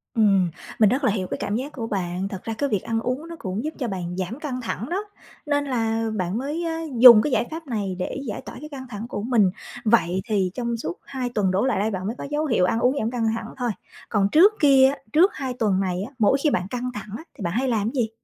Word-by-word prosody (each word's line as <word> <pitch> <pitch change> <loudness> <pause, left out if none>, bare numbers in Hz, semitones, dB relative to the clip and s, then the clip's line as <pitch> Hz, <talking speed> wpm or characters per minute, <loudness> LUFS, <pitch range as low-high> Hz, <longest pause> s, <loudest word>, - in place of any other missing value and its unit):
Ừm, 195 -5 +4 0.3
mình 215 -3 +6
rất 260 +6 0
là 255 - +4
hiểu 190 -3 -2
cái - - -4
cảm 205 - -2
giác 265 +6 -3
của 230 -5 -5
bạn, 185 -2 -2
thật 190 -2 -7
ra 225 - -3
cái 285 - 0
việc 205 -6 0
ăn 225 0 -1
uống 255 +7 -3
nó 335 - -7
cũng 190 +3 -3
giúp 310 +1 -3
cho 250 - -1
bạn 180 -4 -4
giảm 190 +8 -4
căng 265 -5 -4
thẳng 235 +1 -4
đó, 380 +4 -1 0.4
nên 290 -1 +1
là 225 -3 0
bạn 185 0 -1
mới 290 +7 -3 0.4
dùng 235 -3 +11
cái 295 - -1
giải - - +2
pháp 320 -1 -7
này 205 -6 -2
để 180 - -3
giải 210 - -4
tỏa - - -10
cái 300 +3 -9
căng 270 -3 -8
thẳng 215 -1 -6
của 205 - -4
mình. 220 -6 +3 0.3
Vậy 190 -5 +3
thì 200 -5 0
trong 235 0 -2
suốt 170 -6 -5
2 260 -3 -3
tuần 200 -4 +2
đổ 195 +6 +1
lại 265 - +1
đây 215 +2 0
bạn 190 -1 -3
mới 225 - -3
có - - -6
dấu 300 +1 0
hiệu 230 -10 +2
ăn 225 +5 +1
uống 250 +3 +2
giảm 220 +1 -1
căng 235 -2 0
thẳng 225 -1 -5
thôi, 245 -3 -1 0.4
còn 200 -2 +2
trước 365 - +6
kia 270 -3 +7
á, 280 - -4 0.2
trước 355 +6 +5
2 265 -2 -4
tuần 210 -6 +1
này 185 -2 -1
á, - - -17
mỗi 225 +5 +4
khi 305 - +4
bạn 180 -9 -1
căng 250 +3 -3
thẳng 210 -1 -7
á 320 - -10
thì - - -10
bạn 170 - -1
hay 255 +5 0
làm 225 -3 0
gì? 245 -5 0
230 Hz, 270 wpm, -24 LUFS, 200-265 Hz, 0.4 s, dùng